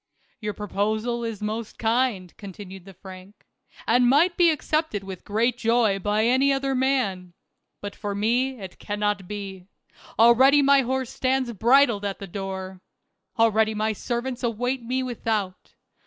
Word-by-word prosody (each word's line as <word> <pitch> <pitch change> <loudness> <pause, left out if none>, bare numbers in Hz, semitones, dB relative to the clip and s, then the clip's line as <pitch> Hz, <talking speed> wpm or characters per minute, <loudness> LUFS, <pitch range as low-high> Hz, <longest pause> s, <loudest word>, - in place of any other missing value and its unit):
" - - -40
Your 210 -1 -4
proposal 215 +4 -2
is 225 -3 -5
most 220 +1 -4
kind," 225 -6 0
continued 195 -2 -10
the 195 - -12
Frank, 190 +2 -13 0.4
"and 245 +1 +3
might 335 +7 +4
be 345 -1 +5
accepted 310 -8 -1
with 190 -2 -8
great 235 +4 0
joy 225 -4 +2
by 210 +3 0
any 260 +3 +3
other 270 0 0
man. 250 -10 -1 0.5
But 205 0 -6
for 205 -1 -4
me 245 +5 0
it 190 -2 -10
cannot 205 -2 -2
be. 195 -2 -7 0.5
Already 260 +5 +6
my 280 0 +5
horse 260 0 -2
stands 260 -1 0
bridled 235 0 +3
at 200 -1 -3
the 200 - -8
door; 190 0 -6 0.6
already 220 -1 +3
my 215 +1 0
servants 240 +3 -4
await 245 +2 -1
me 255 +3 -2
without. 220 -6 -4
220 Hz, 150 wpm, -24 LUFS, 200-255 Hz, 0.6 s, Already